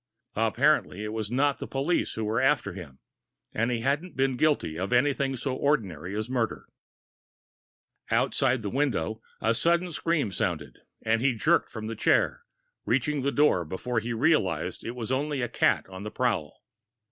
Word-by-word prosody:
Apparently 110 -2 +2
it 105 0 -4
was 110 -2 -3
not 140 +3 +1
the - - -5
police 140 +6 0
who 110 - -2
were 110 +3 0
after 130 -8 +2
him, 80 -8 -10 0.6
and 115 +2 +1
he 120 -2 -1
hadn't 145 +8 -1
been 135 -1 +2
guilty 145 - +1
of 95 +4 -3
anything 135 +1 +2
so 130 +1 -2
ordinary 100 - -1
as 110 - -2
murder. 125 -3 -2 1.4
Outside 130 -3 +1
the 100 - -3
window, 115 - -1 0.2
a 115 - +2
sudden 170 +7 +1
scream 160 - 0
sounded, 95 -5 -3 0.2
and 115 +1 +2
he 130 -2 +2
jerked 110 - +2
from 110 -1 -7
the 115 +1 -4
chair, 110 - +2 0.4
reaching 150 -2 0
the 140 +2 0
door 145 -13 +3
before 105 +9 -2
he 115 +2 -4
realized 100 - +1
it 120 - -5
was 120 0 -5
only 140 0 0
a - - 0
cat - - +2
on 95 0 -9
the 105 - -5
prowl. 110 -12 -2
120 Hz, 170 wpm, -27 LUFS, 105-140 Hz, 1.4 s, door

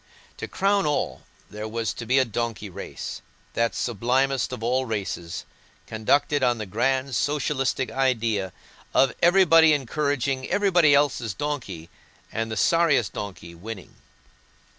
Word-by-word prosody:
To - - -5
crown 195 -3 +1
all, 150 - -1 0.3
there 105 +2 -6
was 115 +1 -2
to 120 - -8
be 130 +3 +3
a 130 - +4
donkey 115 -3 -4
race—that 115 +5 -5
sublimest 125 +4 0
of 125 -3 -6
all 130 +3 +1
races, 100 -7 -4 0.4
conducted 140 +6 +1
on 120 -2 +2
the 110 - -4
grand 130 +6 0
socialistic 135 -2 0
idea 115 -7 0 0.4
of 135 -1 +4
everybody 165 -3 +6
encouraging 140 -1 -1
everybody 180 -8 +4
else's 125 -8 +1
donkey, 115 - -4 0.4
and 115 0 -2
the 110 - -3
sorriest 145 - +3
donkey 95 -4 -7
winning. 95 +3 -9
125 Hz, 125 wpm, -25 LUFS, 110-145 Hz, 0.4 s, everybody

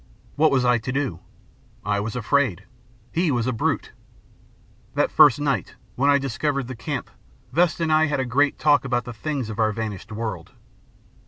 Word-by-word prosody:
What 155 +2 +4
was 130 -3 +2
I 125 -1 +3
to 130 - -4
do? 130 - -2 0.7
I 105 -1 +1
was 105 +3 -4
afraid. 125 -5 +1 0.5
He 170 0 +1
was 120 -5 0
a 130 - 0
brute. 115 - -1 1.0
That - - +1
first 145 -2 +6
night, 140 -2 -1 0.2
when 140 +3 +2
I 140 - +6
discovered 140 +1 -2
the 130 - -6
camp, 130 +3 -5 0.4
Vesta 170 +1 +2
and 160 -1 +1
I 155 0 +4
had 135 -3 -1
great 140 +4 +2
talk 145 -1 +3
about 125 -2 -1
the 120 - -6
things 130 -1 -3
of 105 - -7
our 110 -1 +3
vanished 110 -1 -5
world. 110 -1 -5
130 Hz, 175 wpm, -23 LUFS, 115-145 Hz, 1.0 s, first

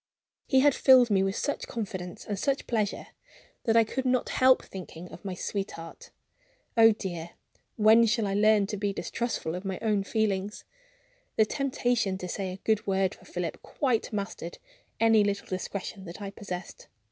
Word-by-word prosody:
He 265 -1 +4
had 290 0 +5
filled 255 -4 +6
me 195 -1 +4
with 195 0 0
such 285 - -2
confidence 185 -6 -5
and 205 -2 -3
such 275 +3 0
pleasure 215 -4 -2 0.6
that 230 -1 +4
I 230 - +7
could 260 +4 -3
not 255 -1 +1
help 260 0 +4
thinking 180 -2 -9
of 165 - -11
my 190 -2 -4
sweetheart. 180 -4 -5 0.7
Oh 225 -1 +8
dear, 175 -5 -5 0.4
when 225 +2 +6
shall 215 0 +1
I 195 - -1
learn 210 0 +4
to 205 +1 -4
be 200 0 -1
distrustful 235 -7 -3
of 180 +2 -5
my 190 -2 -3
own 210 -3 +1
feelings? 205 -1 -1 0.7
The 220 - +5
temptation 245 -6 0
to 180 - -6
say 190 +1 -3
a 185 - -7
good 220 -2 +1
word 190 -1 +1
for - - -17
Philip 175 -2 -4
quite 255 -6 -1
mastered 200 -5 -5 0.4
any 225 -2 +5
little 200 0 -1
discretion 190 +1 -5
that 170 +3 -9
I 200 -1 -5
possessed. 185 -3 -7
205 Hz, 170 wpm, -28 LUFS, 190-225 Hz, 0.7 s, Oh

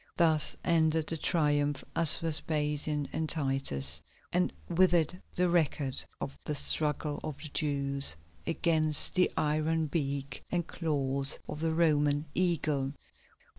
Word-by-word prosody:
Thus 160 -3 +4
ended 160 -2 +2
the 165 - -3
Triumph 145 -4 0
of 165 -3 +8
Vespasian 150 -2 -1
and 160 -1 -2
Titus, 135 - 0 0.3
and 180 +1 +1 0.2
with 180 +1 +3
it 170 +2 0
the 180 0 +2
record 155 -6 0 0.2
of 135 - -5
the 150 - -3
struggle 150 0 +1
of 150 -3 -5
the 155 +1 -8
Jews 140 -2 0 0.3
against 160 -2 +3
the 180 - +3
iron 155 +2 0
beak 140 -2 -3
and 175 -2 -1
claws 140 -4 0
of 150 - -6
the 160 0 -1
Roman 150 -3 +2
Eagle. 155 -6 0
150 Hz, 130 wpm, -30 LUFS, 145-165 Hz, 0.3 s, of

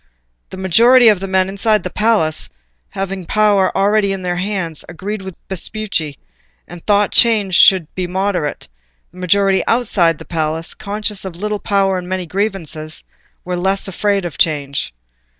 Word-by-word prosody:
The 190 - -9
majority 230 +6 +5
of 210 -4 +3
the 195 - -5
men 190 0 +1
inside 210 +2 0
the - - -5
palace, 210 -8 0 0.4
having 190 -2 -5
power 205 -3 +3
already 200 0 +2
in 190 -1 -4
their 175 -1 -2
hands, 180 -4 -3
agreed 195 +4 -5
with 190 -2 -8
Vespucci, 190 -6 -2 0.5
and 175 -1 -11
thought 205 -1 +3
change 215 -5 +4
should 185 -1 +6
be 185 -1 -3
moderate; 185 -4 -2 0.4
the 180 - -14
majority 195 +2 +2
outside 185 -9 +2
the - - -11
palace, 160 0 -3
conscious 210 0 -4
of 190 -3 -7
little 210 +3 -3
power 195 -2 +1
and 180 0 -9
many 185 -1 -2
grievances, 170 -5 -3 0.4
were 180 0 -2
less 190 +3 -1
afraid 200 0 -1
of 170 - -7
change. 140 - 0
190 Hz, 155 wpm, -17 LUFS, 175-205 Hz, 0.5 s, should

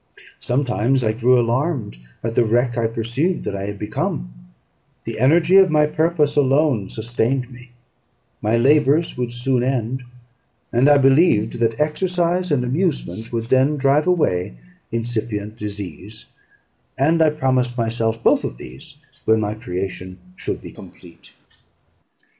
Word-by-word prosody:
Sometimes 125 0 0
I 110 - +2
grew 125 +3 +3
alarmed 120 - -1 0.2
at 115 0 -2
the 120 - +3
wreck 120 +2 +1
I 115 -2 +1
perceived 120 +10 -2
that 100 - -4
I 100 0 -4
had 100 0 -5
become; 65 - -3 0.7
the - - -6
energy 165 +8 +4
of 190 -1 +6
my 150 -1 +3
purpose 155 -1 0
alone 135 -6 +2
sustained 120 +3 -2
me: 125 0 -14 0.7
my 110 +2 +1
labours 145 +5 +3
would 125 -1 -3
soon 120 +1 0
end, 130 0 -1 0.7
and 125 +5 +4
I 145 - +6
believed 135 -5 +3
that 115 +2 0
exercise 175 +3 0
and 135 -4 +2
amusement 125 - -2
would 115 -1 -2
then 130 +5 +2
drive 140 +3 +2
away 90 - +1 0.4
incipient 110 -2 -3
disease; 105 0 -8 0.7
and 160 +5 +2
I 160 - +5
promised 130 -4 0
myself 115 -1 -1
both - - +3
of - - -5
these 65 - -12 0.3
when 110 0 +3
my 105 -1 -2
creation 95 -3 -6 0.2
should - - -5
be - - -9
complete. 85 -2 -15
125 Hz, 140 wpm, -20 LUFS, 110-145 Hz, 0.7 s, of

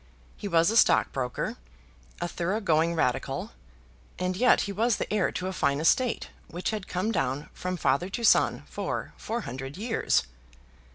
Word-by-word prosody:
He 205 - -6
was 170 +1 +3
a 225 - +2
stockbroker, 130 - +2 0.6
a 175 - -1
thorough 175 +5 -1
going 170 -4 +2
Radical, 125 -6 -1 0.7
and 185 +1 -1
yet 250 +6 +4
he 200 - -3
was 225 +2 +1
the - - -3
heir 205 -3 +2
to 185 - -3
a 190 - -2
fine 140 -4 +1
estate, 235 +10 +2 0.2
which 175 +5 -3
had 210 -3 -4
come 185 +5 -1
down 140 - -1
from 180 0 -3
father 160 +4 +1
to 235 +4 -4
son 225 - +4
for - - -4
four 235 +2 -3
hundred 135 - -6
years! 225 +3 +1
180 Hz, 165 wpm, -27 LUFS, 160-210 Hz, 0.7 s, yet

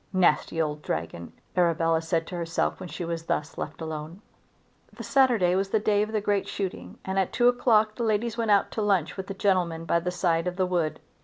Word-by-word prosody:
"Nasty 175 -3 +2
old 150 -2 -1
dragon!" 85 - -4 0.2
Arabella 165 -2 +2
said 165 0 -1
to 180 - -7
herself 165 -1 -1
when 180 - -7
she 175 - -5
was 165 -1 -4
thus 150 -1 -2
left - - -6
alone. 160 +4 -6 0.7
The - - -9
Saturday 245 -10 +3
was 195 +1 0
the 220 - +2
day 205 -1 +2
of 215 +1 -2
the 220 - +1
great 205 -1 0
shooting 195 -3 -5
and 190 0 0
at 190 - 0
two 245 - +3
o'clock 225 -3 +3
the 235 - -4
ladies 220 +1 0
went 230 -2 -1
out 200 -1 +3
to 220 - -3
lunch 195 -6 +1
with 190 0 -6
the 195 - -5
gentlemen 180 -5 0
by 170 +1 +2
the 175 +2 -3
side 175 -1 0
of 180 - -2
the 185 0 +1
wood. 170 -4 -1
180 Hz, 220 wpm, -26 LUFS, 165-205 Hz, 0.7 s, Saturday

